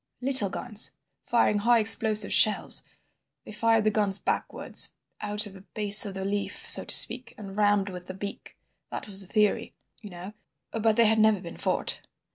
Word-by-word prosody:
"Little 255 -5 +1
guns, 215 +2 -2 0.3
firing 210 -3 -1
high 235 +3 +1
explosive 220 -1 +4
shells. 215 - +2 0.6
They - - -12
fired 225 +1 -1
the 215 - -1
guns 205 -2 -1
backwards, - - -2 0.3
out 210 0 0
of 205 - -13
the 190 - -16
base 210 +1 +5
of 195 - -10
the 190 0 -7
leaf, 200 0 -6
so - - +7
to - - +1
speak, 255 0 +1
and 195 -2 -12
rammed 205 -1 -1
with 180 -1 -12
the 185 - -10
beak. 200 +1 -11 0.3
That - - -9
was 200 -1 0
the 190 - -10
theory, 210 +1 -3 0.3
you 210 - -12
know, 180 +3 -12 0.4
but 225 -1 -2
they 235 0 +2
had 220 0 0
never 215 -2 +1
been 170 -2 -12
fought. - - -2
210 Hz, 185 wpm, -24 LUFS, 195-220 Hz, 0.6 s, so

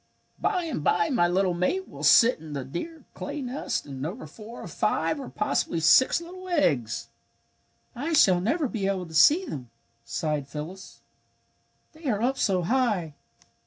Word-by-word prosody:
"By 370 -4 0
and 315 - -4
bye 170 +2 +2
my 175 -10 +3
little 185 +1 +1
mate 185 - -1
will - - -11
sit 240 -3 +6
in 155 -1 -9
the 135 -3 -4
dear 315 - -7
clay - - -5
nest 255 -1 -3
and 135 -2 -7
over 180 - -5
four 225 +2 -11
or - - -7
five 300 - 0
or 270 - -7
possibly 210 -5 -1
six 215 - +5
little 365 +2 -10
eggs." 140 - 0 0.9
"I 290 +7 -3
shall 185 - +5
never 290 - 0
be 210 -5 -2
able 190 -2 -1
to 165 - -12
see 295 - +5
them," 125 - -7 0.3
sighed 140 +5 -2
Phyllis. 160 +6 -8 0.9
"They 315 +1 -15
are 210 -4 0
up 255 +4 0
so 185 -3 +1
high. 205 - 0
195 Hz, 165 wpm, -26 LUFS, -, 0.9 s, sit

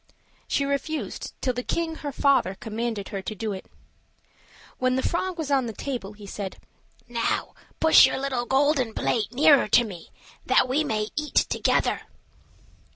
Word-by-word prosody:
She 280 - +1
refused, 280 +3 -3
till 255 - 0
the 245 - -3
king, 325 +4 -2
her 290 - -5
father, 270 -9 +2
commanded 220 -1 -4
her 195 - -4
to 215 - -5
do 215 0 -3
it. 190 - -8 1.1
When 255 0 +2
the 260 - 0
frog 360 +1 -1
was 310 -3 -3
on 265 -3 +2
the 225 - -5
table, 235 -5 -5
he 205 0 -12
said, 195 -1 -6 0.5
"Now 235 -1 -1 0.3
push 320 -4 +8
your - - -2
little 265 -3 -2
golden 270 -4 +2
plate 220 -2 0
nearer 280 +1 +5
to 240 +3 +5
me, 185 -7 -9 0.3
that - - +3
we 275 +5 +1
may 215 -6 -1
eat 300 +1 -4
together." - - +2
255 Hz, 160 wpm, -25 LUFS, 215-280 Hz, 1.1 s, push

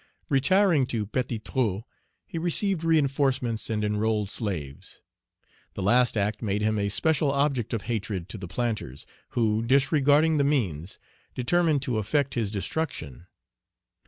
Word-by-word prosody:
Retiring 155 +1 +3
to 110 -4 -2
Petit 120 +2 -2
Trou, 110 -2 -1 0.4
he 165 - -5
received 175 +1 0
reinforcements 135 -8 +1
and 105 -1 -1
enrolled 105 -1 0
slaves. 80 - -5 0.7
The 95 - -4
last 120 +3 +3
act 105 +1 -1
made 105 -1 -1
him 110 0 +1
a 100 0 0
special 150 - +2
object 140 -5 0
of 115 -4 -2
hatred 105 -6 -3
to 110 - -7
the 95 - -6
planters, 105 - -3 0.3
who, 110 -2 +2
disregarding 145 +5 +3
the 140 - +3
means, 100 - -1 0.4
determined 155 +2 +1
to 125 -5 -1
effect 135 +6 0
his 115 -4 -1
destruction. 95 - -4
120 Hz, 135 wpm, -26 LUFS, 105-140 Hz, 0.7 s, Retiring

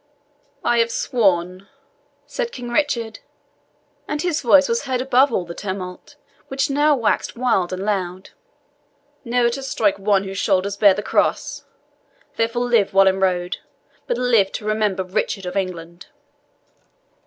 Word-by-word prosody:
"I 240 - +2
have 230 0 +3
sworn," 190 -6 0 0.6
said 485 -1 -4
King 245 -2 -7
Richard 240 -5 -1 0.9
and 295 - -3
his 330 -1 -1
voice 280 +3 +5
was 235 +4 -1
heard 260 -2 -1
above 265 +1 +3
all 185 -6 -1
the 170 - -7
tumult, 185 +6 -7 0.3
which 275 +2 -1
now 295 +1 +3
waxed 230 -5 0
wild 230 -8 +1
and 185 +1 -4
loud 190 -3 -3 0.9
"never 240 -1 +1
to 275 - -5
strike 215 -7 0
one 195 -1 +2
whose 195 -1 -5
shoulder 195 0 +1
bears 200 -3 +6
the 205 - -4
cross; - - 0 0.7
therefore 230 +2 0
live, 235 -6 +2
Wallenrode 190 -2 +2 0.5
but - - -1
live 230 -6 +2
to 210 - -5
remember 215 -3 0
Richard 190 +1 -2
of 180 - -5
England." 175 -3 -4
215 Hz, 140 wpm, -21 LUFS, 190-245 Hz, 0.9 s, bears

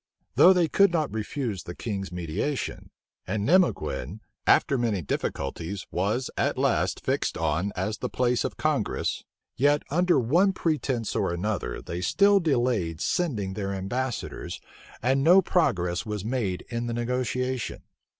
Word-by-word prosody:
Though 185 - +7
they 180 -3 +3
could 200 +4 +4
not 155 -7 0
refuse 110 - -3
the 85 - -8
king's 100 -4 -4
mediation, 90 - -3 0.4
and 105 +1 -1
Nimeguen, 165 - +1 0.3
after 140 - +4
many 115 -8 0
difficulties, 80 +8 -3
was 105 +8 -1
at - - 0
last - - +1
fixed - - 0
on 85 +5 0
as 100 +4 -2
the - - -3
place 125 -1 +1
of - - -4
congress, - - -1 0.3
yet, 145 +3 +3
under 175 +1 +3
one 170 - +3
pretence 140 - -1
or 85 - 0
other, 100 - -2
they 85 +1 -5
still 200 - +4
delayed 120 - 0
sending 105 - -1
their 100 0 -3
ambassadors, 120 +6 -4 0.4
and 135 +3 +2
no 175 +5 +7
progress 90 - +1
was 105 -2 -4
made 110 -7 -2
in 120 0 -3
the 120 - -2
negotiation. 125 +1 -2
120 Hz, 140 wpm, -26 LUFS, 95-145 Hz, 0.4 s, Though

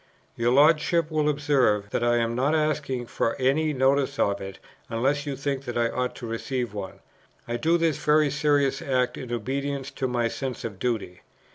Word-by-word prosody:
"Your 115 +1 +1
Lordship 155 +3 +4
will 155 -1 +1
observe 135 -9 +1
that - - -1
I 120 0 +3
am 115 0 0
not 135 +6 +1
asking 150 -5 -1
for 115 - -1
any 145 +4 +2
notice 135 0 +1
of 100 - +1
it, 95 0 -7 0.3
unless 135 +6 0
you 140 - -2
think 135 0 -3
that 120 -1 -4
I 115 -1 +2
ought 125 0 -2
to - - -8
receive 115 0 -3
one. 100 -2 -7 0.5
I 120 0 -2
do 165 +7 +2
this 165 -3 0
very 150 -1 +4
serious 145 -2 +1
act 130 -2 0
in 125 -3 -7
obedience 135 +3 -3
to 135 -1 -2
my 120 -2 0
sense 130 +2 -5
of 100 -5 -6
duty. 110 -7 -2
130 Hz, 185 wpm, -25 LUFS, 120-145 Hz, 0.5 s, Lordship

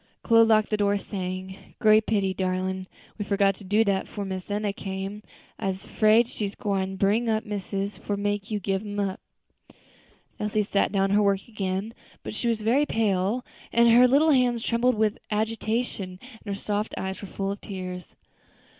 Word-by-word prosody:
Chloe 230 -1 +6
locked 215 -1 +3
the 215 - +2
door, 205 0 +2
saying, 190 -1 -6
"Great 215 0 +5
pity, 200 -3 +1
darlin', 185 0 -2 0.3
we - - 0
forgot 200 -1 +2
to - - -13
do 205 +4 +3
dat 195 -3 0
'fore 205 -2 -5
Miss 190 0 -5
Enna 205 0 -1
came. 195 +1 -5 0.4
I'se 190 -1 -2
'fraid 220 +2 +4
she 210 -4 -3
gwine 195 -2 -2
bring 205 +5 +2 0.2
missus 200 0 -3
for 205 - -3
make 205 0 -2
you 210 -2 -1
gib 195 0 -1
um 205 -1 -5
up." 195 -2 -1 1.2
Elsie 210 0 0
sat 200 0 +1
down 195 -1 +2
to 200 - +2
her - - +4
work 200 -1 +1
again, 200 0 -3 0.3
but - - -5
she 235 - -2
was 230 -2 0
very 255 +7 +2
pale, 215 +2 0 0.3
and 235 0 +5
her 245 +2 +7
little 295 +5 +4
hands 245 -4 +2
trembled 245 +1 +2
with 215 -1 +1
agitation, 220 -3 -2
and 250 -4 -15
her - - -9
soft 210 +1 -2
eyes 190 0 -4
were 200 - -7
full 195 +1 -3
of 200 - -6
tears. 185 -3 -7
205 Hz, 180 wpm, -26 LUFS, 195-220 Hz, 1.2 s, her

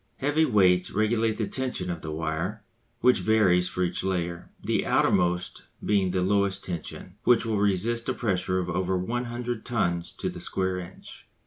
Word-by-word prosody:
Heavy 145 +3 +2
weights 90 -8 +3
regulate 110 +1 +1
the 110 - 0
tension 125 -8 -2
of 85 -2 -5
the 80 - -6
wire, 80 +7 -3 0.4
which 125 - +5
varies 90 -5 +3
for 90 - -1
each 90 0 -1
layer, 85 -2 -2
the - - +1
outermost 90 0 +1 0.2
being 100 -2 +2
at 90 - -3
the 90 -1 +1
lowest 100 0 +1
tension, 90 +2 -6
which 120 -1 +4
will 110 -3 0
resist 105 +5 +1
a - - +1
pressure 95 -4 0
of 90 -1 -1
over 90 +1 0
100 120 +3 -3
tons 85 -8 -1
to - - -4
the - - -5
square 95 -1 -1
inch. 90 +1 -11
95 Hz, 175 wpm, -27 LUFS, 90-115 Hz, 0.4 s, which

